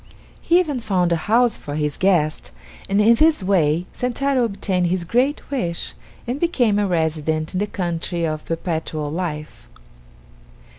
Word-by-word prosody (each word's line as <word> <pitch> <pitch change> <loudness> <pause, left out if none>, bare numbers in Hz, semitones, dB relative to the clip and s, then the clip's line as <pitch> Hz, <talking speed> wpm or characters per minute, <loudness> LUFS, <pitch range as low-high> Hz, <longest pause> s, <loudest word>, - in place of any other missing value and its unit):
He 345 +1 +4
even 300 -8 -1
found 185 -6 0
a - - +4
house 235 0 +4
for 145 - -6
his 150 -1 -1
guest, 175 -5 +1 0.4
and 200 +1 +2
in 220 +3 +6
this 310 -2 +3
way 175 -3 +2
Sentaro 255 +1 0
obtained 190 -4 -1
his 175 0 -1
great 255 - 0
wish 175 -12 -2 0.3
and 250 +3 -3
became 245 -12 +2
a 205 - +1
resident 160 -2 -1
in 185 - -1
the 205 - 0
country 170 -2 -2
of 155 -1 -3
Perpetual 160 -3 -3
Life. 155 - -5
185 Hz, 150 wpm, -21 LUFS, 160-235 Hz, 0.4 s, in